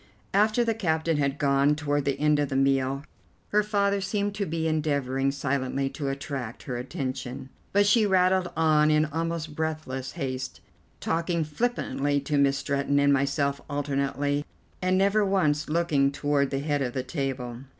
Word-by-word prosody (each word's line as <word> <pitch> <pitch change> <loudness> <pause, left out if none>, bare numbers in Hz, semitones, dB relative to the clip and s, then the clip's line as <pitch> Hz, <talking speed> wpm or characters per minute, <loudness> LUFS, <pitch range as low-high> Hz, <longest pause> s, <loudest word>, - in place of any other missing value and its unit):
After 215 +4 +3
the 230 -1 +1
captain 165 -6 0
had 140 -1 0
gone, 140 0 +3
toward 145 -2 -1
the 140 - 0
end 150 0 +3
of 145 -2 0
the 135 - -3
meal, 135 0 +1 0.5
her 210 - +3
father 200 -1 +1
seemed 200 +1 -1
to 200 -1 -2
be 160 0 -1
endeavouring 140 -4 0
silently 135 -1 -1
to 140 -3 -3
attract 135 -3 -5
her 125 - -4
attention; 130 -1 -5 0.2
but 205 +1 +4
she 210 +1 +4
rattled 185 -1 +3
on 155 -1 +4
in 155 0 +4
almost 160 0 -3
breathless 155 -5 -3
haste, 130 -5 -4 0.4
talking 165 0 0
flippantly 150 - -1
to 145 +1 0
Miss 140 0 +3
Stretton 140 0 0
and 140 0 +4
myself 140 +1 0
alternately, 145 0 -1 0.4
and 185 0 +2
never 200 +2 +3
once 155 -7 +1
looking 155 -4 +2
toward 140 -1 +1
the 135 - -2
head 145 -1 0
of 125 -2 -2
the 130 - -2
table. 130 -4 -4
145 Hz, 160 wpm, -27 LUFS, 140-170 Hz, 0.5 s, but